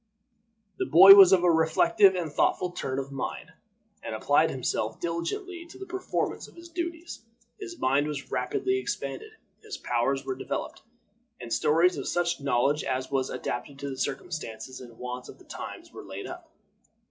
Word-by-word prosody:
The - - -1
boy 190 +5 +10
was 195 -2 +9
of 185 -2 +4
a 175 - +5
reflective 185 +5 +4
and 170 -4 -3
thoughtful 180 +3 +1
turn 135 -6 -4
of 135 0 -4
mind, 135 -2 -5 0.5
and - - -5
applied - - +3
himself - - -2
diligently 340 - -4
to 340 - -13
the 390 - -8
performance 380 0 -3
of - - -19
his 340 0 -12
duties. 340 0 -5 0.4
His 365 -4 -8
mind 140 +3 +1
was 145 -2 -6
rapidly 390 -1 -1
expanded, 435 +2 -5 0.3
his 430 -1 -7
powers 135 +3 -1
were 135 - -2
developed, 130 - -5 0.6
and 120 -1 -5
stores 165 +4 +3
of - - -5
such 175 -3 0
knowledge 140 +2 +1
as 130 +1 -3
was 135 -1 0
adapted 135 +3 -5
to 140 0 -5
the - - -5
circumstances 135 -5 -5
and 120 -2 -13
wants 125 0 -6
of - - -12
the - - -19
times - - -9
were - - -9
laid 100 0 -8
up. - - -9
160 Hz, 170 wpm, -27 LUFS, -, 0.6 s, boy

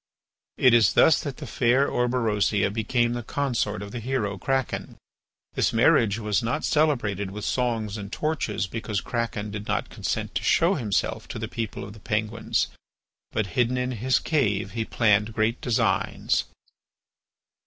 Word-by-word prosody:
It 125 -2 +5
is 115 -2 +5
thus 160 - +5
that 140 -4 -5
the 150 - -7
fair 130 +1 +2
Orberosia 110 -5 +1
became 120 +2 +1
the 120 - -3
consort 120 -5 -1
of 100 - -8
the 120 - -5
hero 115 -4 -1
Kraken. 135 +1 -2 0.6
This - - +1
marriage 115 -3 +4
was 105 0 0
not 120 +7 -1
celebrated 120 - +1
with 105 +2 -6
songs 115 -4 -1
and 100 -1 -7
torches 150 -11 -1
because 105 0 -3
Kraken 105 +1 -3
did 105 0 -6
not - - -1
consent - - -3
to - - -2
show 170 +4 +3
himself 110 - -1
to - - -6
the - - -4
people 115 -3 -4
of 100 - -8
the 110 - -13
Penguins; 110 +1 -1 0.6
but 110 - 0
hidden 125 +1 +1
in 125 0 -1
his 125 +2 +1
cave 105 -11 0
he 115 +1 -2
planned 105 -1 +2
great 110 +2 0
designs. 120 -3 +1
115 Hz, 155 wpm, -25 LUFS, 105-125 Hz, 0.6 s, It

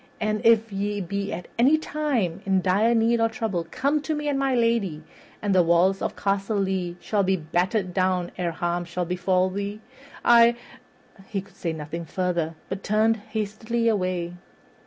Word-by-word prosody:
And 215 -1 -1
if 225 -1 +4
ye 205 +1 -2
be 200 +2 -3
at 175 - -5
any 275 +6 +5
time 270 - -1
in 190 -1 +2
dire 210 +6 +3
need 230 +1 +3
or 225 - +3
trouble, 215 -7 -3
come 285 - 0
to 310 +1 -2
me 295 0 -3
and 280 -2 0
my 270 -1 +1
lady, 230 -10 +1 0.4
and 205 -1 +1
the 185 - +6
walls 175 +3 +3
of - - -2
Castle 200 +1 -1
Lea 190 -3 -1
shall 210 -2 0
be 190 0 +2
battered 180 +4 -1
down 185 -1 0
ere 180 -2 -1
harm 175 +1 -2
shall 175 +1 -3
befall 185 +1 0
you. 205 +1 -4 0.5
I 235 0 +7 0.3
" 195 - -23
He 200 - -1
could 195 -1 -12
say 170 - -3
nothing 160 +2 -6
further, 170 -2 -1
but 190 0 -4
turned 220 +2 +2
hastily 220 +2 -2
away. 185 -5 0
195 Hz, 180 wpm, -25 LUFS, 180-225 Hz, 0.5 s, I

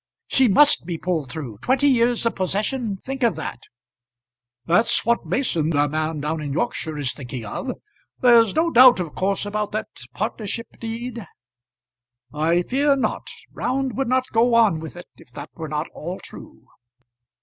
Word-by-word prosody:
"She 265 -1 +3
must 260 - +4
be 170 -2 -3
pulled 160 -7 -2
through. 125 -9 -7
Twenty 265 - +2
years 240 -3 +3
of 230 - +1
possession! 205 +3 -1
Think 270 0 -5
of 235 -3 +2
that." - - -6 1.1
"That's 195 +9 +2
what 235 +1 +1
Mason, 170 - 0
the 145 -2 +2
man 155 +1 -2
down 155 +2 -2
in 145 -2 -4
Yorkshire, 160 -5 -2
is 140 -3 -1
thinking 125 -4 -7
of. 250 - -4 0.5
There's 230 -4 +5
no 330 +1 +2
doubt 250 -2 +8
of 170 -4 -4
course 195 +2 -1
about 210 0 -3
that 215 - -3 0.3
partnership 220 +1 -3
deed?" 230 -2 -6 1.1
"I 165 +4 +1
fear 280 +6 +2
not. 270 - -2 0.3
Round 260 -2 -2
would 270 -1 -1
not 255 0 +2
go 230 +1 +3
on 215 -8 +4
with 160 +1 -8
it 175 - -9
if 165 - -18
that 145 +1 -9
were 160 -2 -7
not 150 +2 -2
all 175 +4 -6
true." - - -12
205 Hz, 165 wpm, -22 LUFS, 160-245 Hz, 1.1 s, doubt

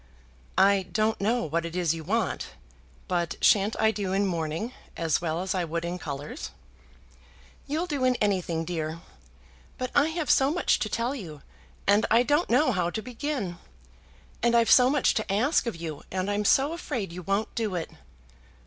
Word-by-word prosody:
"I 195 -1 +4
don't 215 +3 0
know 235 +4 +1
what 165 +2 -1
it 170 0 -6
is 175 -3 +1
you 165 -1 -6
want, - - -1 0.5
but 175 -2 -1
shan't 205 +1 +4
I 220 0 +4
do 200 -3 -3
in 200 +1 +2
mourning 170 +6 -2 0.2
as 165 -1 +1
well 165 0 -1
as 190 - -2
I 185 -2 0
would 170 +1 -3
in 175 +1 -4
colours?" 150 - -6 1.2
"You'll 310 +5 -1
do 290 -7 -2
in 255 -1 +3
anything, 180 -7 0
dear. 160 -1 -4 0.8
But 255 0 -3
I 285 +1 +4
have 320 -2 -1
so 270 0 +4
much 350 +4 +1
to 215 - -2
tell 235 +5 -1
you, 165 - -8 0.4
and 205 +2 +4
I 230 +2 +5
don't 290 +7 +1
know 255 +3 +4
how 180 -5 0
to 220 +4 -4
begin. 250 - -4 0.8
And 235 0 +3
I've 230 -1 +4
so 250 0 +7
much 285 -1 +3
to 215 -3 -2
ask 245 +7 +2
of 230 - -2
you, 165 -3 -6
and 190 +2 -2
I'm 205 +1 -1
so 275 +8 +4
afraid 250 - -4
you 180 - -6
won't 195 +5 -1
do 220 -5 -2
it." 165 -2 -4
205 Hz, 185 wpm, -27 LUFS, 170-250 Hz, 1.2 s, so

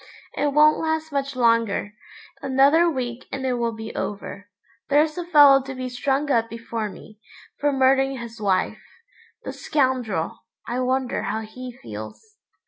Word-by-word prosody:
It 290 0 0
won't 300 +2 +5
last 315 -1 -2
much 275 -1 -2
longer. 230 -4 +1 0.5
Another 280 +6 +4
week 250 -4 -4
and 270 -1 -4
it 255 - +1
will 235 -1 -1
be 220 0 -7
over. 205 0 -5 0.4
There's 300 +2 +3
a 355 - -3
fellow 290 -5 +7
to 265 0 -7
be 255 0 -4
strung 275 +3 -1
up 230 -2 +2
before 230 -1 -4
me, 210 +3 -14 0.4
for 290 0 +2
murdering 270 0 +3
his 235 -2 -9
wife. 195 -3 0 0.6
The - - -5
scoundrel, 255 - -1 0.3
I 245 +1 -2
wonder 255 -1 0
how 215 +1 -2
he 250 +3 -8
feels? 110 - -9
255 Hz, 150 wpm, -23 LUFS, 230-280 Hz, 0.6 s, fellow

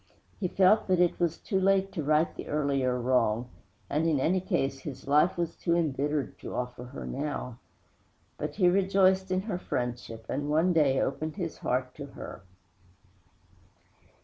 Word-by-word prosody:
He 190 - 0
felt 195 +4 +4
that 185 -2 +2
it 180 -1 +2
was 170 -2 +1
too 195 - -1
late 195 0 +2
to 165 - -3
right 155 +2 +2
the - - -7
earlier 135 -4 0
wrong; 120 -1 +1 0.4
and, 155 +3 0
in 155 -4 +2
any 175 +7 +2
case, 140 -8 -1
his 135 -1 -8
life 150 +6 +4
was 170 -1 -2
too 170 - 0
embittered 145 -3 -1
to - - -7
offer 125 0 -4
her 125 +3 -8
now. 135 -4 -4 0.8
But - - -4
he 185 -3 +4
rejoiced 190 0 +3
in 185 0 +1
her 195 -3 -3
friendship, 120 -5 -4
and, 145 +2 -2
one 160 +4 +3
day, 140 -5 +3
opened 155 +3 -2
his 175 -5 -4
heart 125 0 -1
to 145 -1 -8
her. - - -8
150 Hz, 165 wpm, -29 LUFS, 130-185 Hz, 0.8 s, felt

